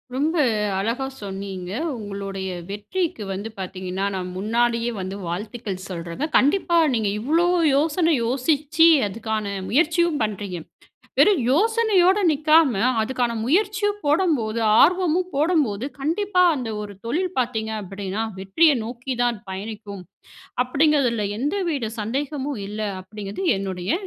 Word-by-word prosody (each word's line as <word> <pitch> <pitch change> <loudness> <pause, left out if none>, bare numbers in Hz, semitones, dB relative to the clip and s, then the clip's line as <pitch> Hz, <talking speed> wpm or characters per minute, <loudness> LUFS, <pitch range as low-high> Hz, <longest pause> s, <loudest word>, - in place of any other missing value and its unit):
ரொம்ப 305 +5 0 0.4
அழகா 230 +7 -1 0.2
சொன்னீங்க. 190 -2 -6 0.3
உங்களுடைய 195 -2 -5 0.2
வெற்றிக்கு 265 - -3
வந்து 205 +4 -5
பாத்தீங்கன்னா, 185 +1 -4
நான் 180 -1 -4
முன்னாடியே 235 +3 +1
வந்து 185 +1 -5
வாழ்த்துக்கள் 195 +1 -5
சொல்லுறேங்க. 170 - -4
கண்டிப்பா 340 +4 +2 0.2
நீங்க 215 -3 0
இவ்வளவு 335 +8 +2 0.2
யோசனை 320 +3 +2
யோசிச்சு 295 +6 +3 0.2
அதுக்கான 220 0 -3 0.2
முயற்சியும் 325 +3 +2
பண்ணுறீங்க. 200 -4 -4 0.6
வெறும் 405 -4 +6
யோசனையோடு 410 - +3
நிக்காம, 305 -1 +4 0.3
அதுக்கான 245 0 -1
முயற்சியும் 410 - +1
போடம்போது 290 -9 +1 0.2
ஆர்வமும் 360 +2 +3
போடம்போது, 285 - +1 0.2
கண்டிப்பா 360 +5 +1
அந்த 245 -3 -4
ஒரு 205 -1 -7
தொழில் 355 +10 -1
பாத்தீங்க 225 -3 -1
அப்டீன்னா, 195 +3 -4 0.2
வெற்றிய 295 - +4
நோக்கி 245 +3 -5
தான் 240 -2 +1
பயணிக்கும். 200 0 -7 0.6
அப்டீங்குறதுல 260 -5 +2
எந்தவித 295 - -1
சந்தேகமும் 275 +3 -3
இல்ல. 210 +1 -6 0.2
அப்டீங்குறது 200 - -7 0.2
என்னுடைய 190 -1 -3
245 Hz, 110 wpm, -23 LUFS, 205-320 Hz, 0.6 s, வெறும்